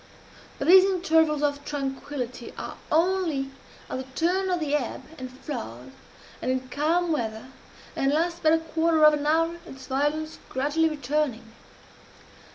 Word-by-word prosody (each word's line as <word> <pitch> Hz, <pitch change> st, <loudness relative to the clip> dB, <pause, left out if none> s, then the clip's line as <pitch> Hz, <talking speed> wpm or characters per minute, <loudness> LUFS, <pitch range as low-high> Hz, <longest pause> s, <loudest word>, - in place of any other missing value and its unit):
But 275 Hz, -, -3 dB
these 370 Hz, +2 st, +9 dB
intervals 320 Hz, -5 st, +2 dB
of 285 Hz, -1 st, 0 dB
tranquillity 270 Hz, -3 st, -5 dB
are -, -, -6 dB, 0.2 s
only 325 Hz, -5 st, +1 dB, 0.4 s
at -, -, -4 dB
the 260 Hz, -, -5 dB
turn 370 Hz, +3 st, +1 dB
of 360 Hz, -1 st, +1 dB
the 300 Hz, -3 st, -2 dB
ebb 285 Hz, -5 st, -1 dB, 0.2 s
and 255 Hz, 0 st, -6 dB
flood, 130 Hz, -, -7 dB, 0.5 s
and -, -, -2 dB
in 260 Hz, 0 st, -1 dB
calm 330 Hz, +5 st, +1 dB
weather, 230 Hz, -4 st, -3 dB, 0.5 s
and 270 Hz, 0 st, +1 dB
last 335 Hz, +3 st, 0 dB
but 315 Hz, -, +4 dB
a -, -, +5 dB
quarter 325 Hz, 0 st, +2 dB
of 305 Hz, -, +8 dB
an 295 Hz, 0 st, -1 dB
hour, 330 Hz, +2 st, +2 dB
its 265 Hz, -1 st, -10 dB
violence 295 Hz, +4 st, -1 dB
gradually 295 Hz, +5 st, +1 dB
returning. 285 Hz, -5 st, -2 dB
300 Hz, 150 wpm, -26 LUFS, 265-325 Hz, 0.5 s, these